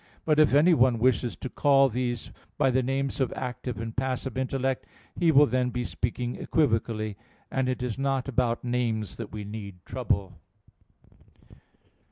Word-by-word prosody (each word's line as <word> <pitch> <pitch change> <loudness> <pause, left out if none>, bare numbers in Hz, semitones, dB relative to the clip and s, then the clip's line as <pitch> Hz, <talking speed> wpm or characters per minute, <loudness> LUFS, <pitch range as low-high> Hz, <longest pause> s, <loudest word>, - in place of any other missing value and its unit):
But 155 -1 +3
if 155 -2 +6
anyone 145 -6 +5
wishes 125 0 +1
to - - -6
call 135 +1 +4
these 120 -1 -3 0.3
by 135 -3 +3
the 130 +1 +2
names 135 +2 -1
of 130 - +1
active 125 -2 -5
and 115 0 -5
passive 130 0 -2
intellect, 130 0 -1 0.3
he 170 -2 +3
will 145 0 +7
then 125 0 0
be 125 0 -2
speaking 120 +1 -3
equivocally; 110 -7 0 0.3
and 130 -1 0
it 130 0 -2
is 125 -1 -3
not 135 -1 0
about 120 -3 0
names 115 -5 -1
that 115 -3 -6
we 105 -1 -5
need 100 -2 -7
trouble. 95 -3 -2
125 Hz, 155 wpm, -27 LUFS, 115-135 Hz, 0.3 s, will